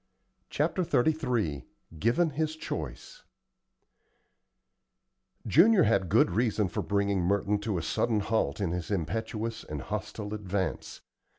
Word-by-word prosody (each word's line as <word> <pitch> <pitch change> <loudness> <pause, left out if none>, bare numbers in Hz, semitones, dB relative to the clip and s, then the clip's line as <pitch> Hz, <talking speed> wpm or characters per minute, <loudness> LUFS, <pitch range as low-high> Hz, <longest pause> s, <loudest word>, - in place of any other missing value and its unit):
CHAPTER 185 - 0
XXXIII 120 - 0 0.3
GIVEN 150 - +2
HIS 155 +2 -1
CHOICE - - -6 2.2
Junior 225 -2 +6
had 100 -5 +2
good - - +4
reason 105 -1 +1
for 105 +2 -2
bringing 100 +1 0
Merton 100 +3 +1
to 105 -2 -2
a 85 - -3
sudden 110 +6 0
halt 100 -9 0
in 95 -5 -1
his 90 -1 -4
impetuous 110 +5 -3
and - - -6
hostile 105 +1 -5
advance. 95 -4 -3
105 Hz, 115 wpm, -29 LUFS, 95-115 Hz, 2.2 s, Junior